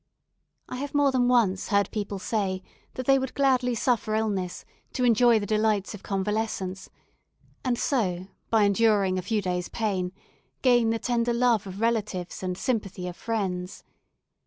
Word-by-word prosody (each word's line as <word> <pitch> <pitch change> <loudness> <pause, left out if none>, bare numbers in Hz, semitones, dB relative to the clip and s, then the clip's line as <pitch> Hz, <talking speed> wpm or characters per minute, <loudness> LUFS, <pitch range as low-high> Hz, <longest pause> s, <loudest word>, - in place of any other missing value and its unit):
I 255 - -6
have 285 +2 -5
more 285 -1 +4
than 250 -2 +2
once 220 -7 +2
heard 200 -2 +2
people 205 -2 -3
say 190 -2 -2 0.3
that 255 - -4
they 270 +1 +5
would 265 -1 -4
gladly 255 -3 +2
suffer 225 -2 0
illness 200 -5 -2 0.3
to 250 - -1
enjoy 240 0 +5
the 205 - -2
delights 215 -2 +1
of 205 - -9
convalescence, 195 -1 -2 0.7
and 250 -2 0
so, 185 -11 0 0.2
by 220 -2 +4
enduring 200 -2 +3
a - - -2
few 210 +2 -1
days' 180 -1 -2
pain, 190 -5 -1 0.5
gain 240 -3 +4
the 225 - +1
tender 235 0 0
love 235 -4 +2
of 190 +2 -7
relatives 210 -6 -1
and 180 -1 -3
sympathy 200 -4 -2
of 175 - -6
friends. 190 -4 -3
215 Hz, 160 wpm, -26 LUFS, 190-240 Hz, 0.7 s, they